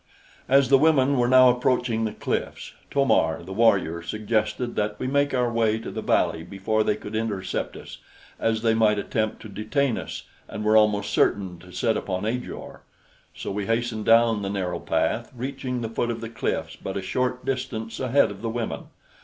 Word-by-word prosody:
As 135 -1 +5
the 135 -1 +6
women 140 -3 +4
were 120 - +3
now 130 0 +7
approaching 125 -2 0
the 110 - -2
cliffs, - - -4 0.2
To 140 -1 +2
mar 80 -10 +2
the 95 +3 -7
warrior 95 -6 +2
suggested 110 +5 -2
that 105 0 -1
we - - -3
make 140 +2 +1
our 125 -2 0
way 110 -1 +2
to 115 - -7
the - - -4
valley 80 - +1
before 100 +5 -1
they 105 - +1
could 105 0 -8
intercept 100 -5 -3
us, - - -11 0.4
as 110 0 0
they 115 -1 +3
might 110 -2 +3
attempt 110 +1 -2
to - - -8
detain 110 +5 -1
us - - -7 0.2
and 105 - -6
were 110 +1 +4
almost 105 -1 +3
certain 95 -4 +1
to 90 +1 -14
set 110 +3 0
upon 95 +1 -3
Ajor. 125 +3 -5 0.5
So - - -5
we 100 0 -3
hastened 115 -1 -1
down 115 -2 +4
the 100 - -3
narrow 95 -3 -2
path, - - -1
reaching 125 0 -4
the 115 - -2
foot 120 +1 -1
of 115 -1 -3
the 115 0 -6
cliffs 115 - -3
but 95 - -5
a 95 - -4
short 125 +4 -1
distance 125 -4 -3
ahead 130 -2 +3
of 100 0 -10
the 115 - -2
women. 115 0 -4
115 Hz, 195 wpm, -25 LUFS, 105-125 Hz, 0.5 s, now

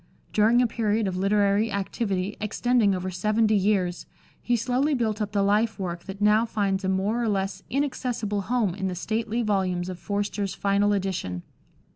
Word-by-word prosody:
During 230 +4 +4
a - - +3
period 220 -2 0
of 185 - -2
literary 200 +3 +2
activity 200 -1 -2
extending 215 -1 +2
over 185 +1 -3
seventy 215 +4 +2
years, 190 -3 0 0.3
he 240 - +1
slowly 255 +6 +1
built 220 -3 -1
up 205 -1 -2
the 200 -1 +1
life 215 +3 +2
work 175 -3 -5
that 195 0 -7
now 210 +2 +4
finds 200 -4 -1
a 190 - 0
more 200 +5 0
or 230 - 0
less 195 -1 -2
inaccessible 250 -7 -1
home 225 -3 0
in 190 0 -3
the 185 - -3
stately 220 +5 -2
volumes 185 -4 0
of 180 -1 -6
Forster's 205 -1 -2
final 200 +1 +2
edition. 185 - -2
205 Hz, 170 wpm, -25 LUFS, 190-225 Hz, 0.3 s, During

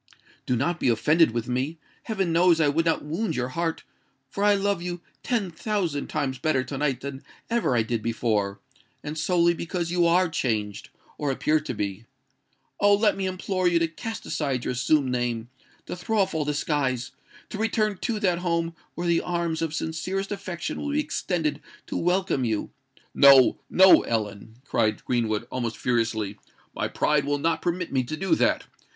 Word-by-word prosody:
Do 125 - +2
not 170 +8 0
be - - +2
offended 150 +8 +4
with 115 0 -3
me:—heaven 160 - -3
knows 170 0 +4
I 150 -2 +4
would 165 +3 +1
not 165 - +1
wound 170 +9 -2
your 125 0 -1
heart; 165 +4 -2 0.5
for 200 - -2
I 205 0 +5
love 200 -2 0
you 175 0 -4 0.2
ten 225 -8 -1
thousand 170 -5 -2
times 130 -2 -2
better 135 -2 +1
to 135 +2 -6
night 140 -4 0
than 140 -1 -6 0.3
ever 235 - +1
I 115 - +3
did 115 0 -2
before—and 115 +5 -3
solely 170 +1 +3
because 170 0 -3
you 175 -1 +3
are 180 +2 +4
changed, 110 - -2 0.3
or 145 - -1
appear 150 +3 +2
to 150 -5 -5
be. 105 +1 -4 0.7
Oh! 205 0 +5
let 210 0 +3
me 195 -1 -2
implore 185 0 -1
you 175 -1 +3
to 165 0 +2
cast 225 +8 -7
aside 135 -5 -2
your - - 0
assumed 135 +2 +2
name—to 120 +4 -5
throw 215 +5 -2
off 190 -2 +2
all 155 -2 -1
disguise—to 145 - -3
return 215 -2 +1
to 230 -3 -2
that 180 -4 +2
home 170 -1 -1 0.2
where 175 - -3
the 170 -1 +3
arms 170 -2 -2
of 160 -1 -2
sincerest 185 +5 -3
affection 185 -4 -4
will 290 - -3
be 300 - +2
extended 175 - -1 0.2
to - - -6
welcome 180 -5 +1
you——" 110 -3 -1 0.4
"No—no, 140 +7 +6
Ellen!" 110 -1 -3
cried 110 -5 0
Greenwood, 115 -3 0
almost 120 -3 -3
furiously: 110 -4 -1 0.3
"my - - -2
pride 150 -1 +1
will 145 +1 0
not 160 +2 0
permit 175 0 -2
me 130 -1 +2
to 155 +5 -5
do 195 - 0
that! - - +2
155 Hz, 170 wpm, -25 LUFS, 125-180 Hz, 0.7 s, No—no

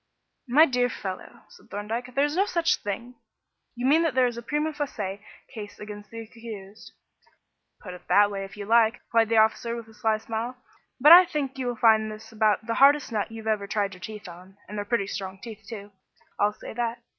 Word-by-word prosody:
"My 290 +6 +6
dear 250 -3 +1
fellow," 190 -5 -7
said - - -19
Thorndyke, 230 +5 -5
"there 280 +1 +3
is 295 +1 -3
no 390 +3 +2
such 340 -3 +1
thing. 235 +5 -6 0.6
You 245 +1 -3
mean 300 +5 +5
that 325 -5 0
there 260 -1 +4
is 240 -1 -1
a 235 - -6
prima 300 +5 -2
facie 210 -10 -4 0.3
case 210 -3 -8
against 210 -1 -9
the 230 +1 -7
accused." 220 -3 -11 0.9
"Put 180 - -9
it 180 - -13
that 205 0 +5
way 195 -1 -4
if 195 +2 -10
you 205 - -6
like," 225 +1 +4
replied 230 -2 0
the 225 - +2
officer, 220 +2 +2
with 230 -1 -8
a 220 - -16
sly 220 0 0
smile, 225 +3 -5 0.4
"but 295 +5 +7
I 360 +2 +11
think 280 -5 -4
you 255 - -2
will 245 - -2
find 220 -1 +4
this 215 +1 -11
about 215 0 +1
the 230 - -1
hardest 285 -1 +5
nut 215 0 -2
you 225 -1 -9
ever 210 -2 0
tried 200 -1 -1
your 180 - -13
teeth 210 -1 -8
on 180 +3 -13
and 210 - -8
they're 205 -1 -3
pretty 205 -2 0
strong 190 -1 -6
teeth 220 0 -10
too, 205 -3 -8 0.5
I'll 205 +1 +2
say - - -10
that. 235 0 -3
225 Hz, 215 wpm, -26 LUFS, 205-245 Hz, 0.9 s, I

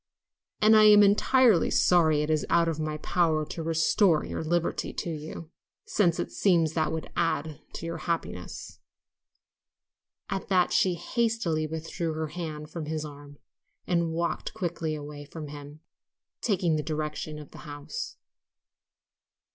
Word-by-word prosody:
"And 215 +1 +7
I 215 0 +7
am 210 -1 +8
exceedingly 210 0 +4
sorry 160 -4 +4
it 150 - -1
is 155 -1 +1
out 170 0 +4
of 160 -2 -2
my 155 0 -2
power 155 -1 +1
to 165 - -6
restore 160 +1 +3
your - - -4
liberty 170 +1 -1
to 170 - -3
you, 155 +1 -7 0.3
since 175 -5 +2
it - - -3
seems 170 -5 +2
that 155 -2 0
would 160 0 -5
add 160 -3 -1
to - - -6
your 165 0 -4
happiness." 160 - -4 1.5
At 195 -1 -4
that 185 -2 +2
she 185 -2 +3
hastily 220 -7 -1
withdrew 160 +1 -4
her 155 0 -3
hand 155 -2 -6
from 160 -3 -5
his 155 0 -3
arm 145 -1 -11 0.5
and 170 -2 +1
walked 170 +5 -2
quickly 170 -5 -2
away 145 0 -8
from 150 +1 -8
him, 145 +1 -10 0.6
taking 180 -7 +1
the - - 0
direction 155 0 -4
of 150 -2 -11
the - - -12
house. 145 - -7
160 Hz, 145 wpm, -28 LUFS, 155-175 Hz, 1.5 s, am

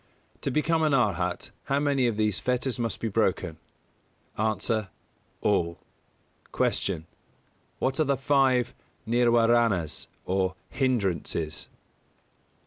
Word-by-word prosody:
To - - -1
become 160 +4 +1
an 155 -3 +3
Arhat, 90 -8 0
how 140 +1 +1
many 140 -3 +2
of 115 -3 -1
these 105 -3 +1
fetters 125 0 -1
must 115 -2 -2
be 115 - -2
broken? 95 -6 0 0.8
A. 110 - 0 1.0
All. 85 -5 +1 0.8
247. 90 -5 0
Q. - - -25 0.7
_What 135 +2 0
are - - +5
the 140 -1 +1
five 130 -3 +2 0.3
Nirwāranas 115 -7 +3 0.2
or 95 0 0 0.2
Hindrances? 95 - -1
115 Hz, 110 wpm, -27 LUFS, 95-130 Hz, 1.0 s, are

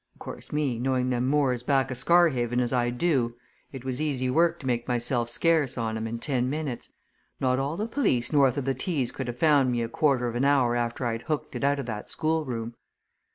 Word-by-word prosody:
Of - - -26
course, - - -8
me, 145 -6 -1
knowing 130 0 0
them 125 0 0
moors 135 -4 +1
back 135 0 +1
o' - - -1
Scarhaven 130 -6 +3
as 125 0 0
I 120 -1 +2
do, 125 -3 0 0.4
it 130 -2 -9
was 130 +1 -2
easy 130 -4 -1
work 170 +4 +2
to - - -10
make 120 -2 -1
myself 120 -1 0
scarce 150 -1 +1
on 110 -2 -2
'em 110 0 -3
in 115 +1 -4
ten 125 0 -1
minutes 145 -4 -4 0.5
not 130 0 +1
all 140 +4 -2
the 210 - -1
police 145 - 0
north 140 -2 +4
o' - - +1
the 135 0 -1
Tees 130 -2 -2
could 130 - -5
ha' 120 - -4
found 140 -2 +3
me 120 -1 0
a - - -2
quarter 130 -1 +1
of 120 - -3
an 120 +2 -1
hour 135 -4 +3
after 120 +1 -2
I'd 115 -1 -2
hooked 155 -2 -2
it - - -4
out 140 0 +2
o' - - -2
that 110 -4 -6
schoolroom! 135 -8 -2
130 Hz, 225 wpm, -26 LUFS, 120-145 Hz, 0.5 s, north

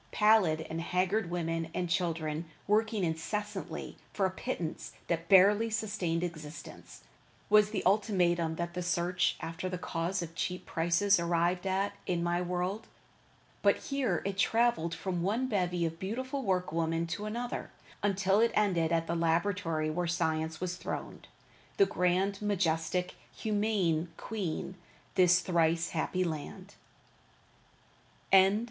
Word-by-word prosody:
Pallid 210 -7 +4
and 165 +1 -4
haggard 180 +3 0
women 165 -1 -2
and 180 - -1
children, 165 -2 -1 0.2
working 215 0 +1
incessantly 190 +3 -3
for 195 - 0
a 190 - +1
pittance 180 -5 -4
that 165 0 -2
barely 205 +4 +6
sustained 200 -6 -1
existence, 155 -3 -8 0.5
was 210 0 +6
the 210 -3 -3
ultimatum 180 -5 +2
that 170 +1 -4
the 180 - -3
search 175 +1 0
after 165 +3 -4
the 180 - -3
cause 175 +2 -2
of 165 -1 -8
cheap 180 +1 -3
prices 175 +4 +2
arrived 170 +2 +1
at 195 +2 0
in 175 -2 0
my 175 +1 0
world, 180 +4 -2 0.7
but - - +4
here 275 -2 -1
it 195 0 -3
traveled 225 -7 +2
from 180 -3 -3
one 215 +8 0
bevy 180 -6 0
of 165 0 -4
beautiful 260 +8 -3
workwoman 165 -5 0
to 170 +5 -4
another 240 +3 -4 0.3
until 195 0 +2
it 230 +1 +4
ended 175 -6 +2
at 165 -1 +1
the 165 - -2
Laboratory 165 -1 0
where 175 +2 -1
Science 160 -2 -1
sat 185 +2 -3
throned, 180 -1 -6 0.5
the 395 - +6
grand, 190 - 0
majestic, 180 -3 0 0.2
humane 205 -6 0
Queen 200 -8 -3
of 185 - -12 0.4
this 180 0 +5
thrice 170 -2 +1
happy 180 +3 -1
land. 180 +4 -5
180 Hz, 135 wpm, -31 LUFS, 165-205 Hz, 0.7 s, barely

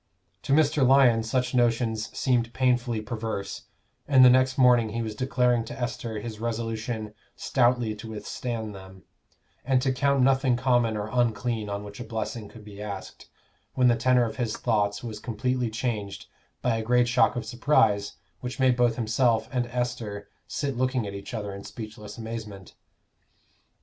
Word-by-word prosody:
To - - -4
Mr. 150 -1 +3
Lyon 130 -3 +5
such 125 +3 -1
notions 115 -2 +1
seemed 120 -3 +1
painfully 125 -3 +1
perverse, 110 -3 -5 0.4
and 130 -2 +7
the 125 - +8
next 130 +1 +3
morning 125 -3 +5
he 115 +2 -3
was 110 -1 -4
declaring 125 0 +1
to 125 - -8
Esther 120 -2 -3
his 110 0 -7
resolution 115 -1 -3 0.2
stoutly 120 -3 +1
to 110 +1 -9
withstand 110 0 -5
them, 95 -1 -12 0.6
and 130 0 +2
to 135 - +2
count 140 0 +2
nothing 130 -1 +3
common 120 -3 +2
or 105 0 -3
unclean 120 -2 0
on 100 0 -4
which 105 0 -10
a - - -4
blessing 110 -1 -5
could 110 -2 -14
be 105 -1 -10
asked, 100 -2 -8 0.5
when 125 -1 +4
the 120 - +4
tenor 125 +1 +3
of 115 - -6
his 120 -4 -2
thoughts 105 -3 0
was 110 -3 -6
completely 125 +1 -1
changed 110 -4 -3 0.4
by 120 -2 +1
a - - -2
great 125 +1 +3
shock 125 +1 +3
of 120 -2 -3
surprise 110 -4 +2 0.3
which 125 +2 -6
made 130 -1 +4
both 120 -2 +2
himself 115 -1 +1
and 125 -2 -1
Esther 120 -4 -4 0.2
sit 140 -3 -3
looking 130 -1 0
at 100 - -5
each 100 0 -8
other 105 -4 -4
in 100 0 -8
speechless 110 -1 -9
amazement. 110 -4 -7
115 Hz, 165 wpm, -26 LUFS, 110-125 Hz, 0.6 s, the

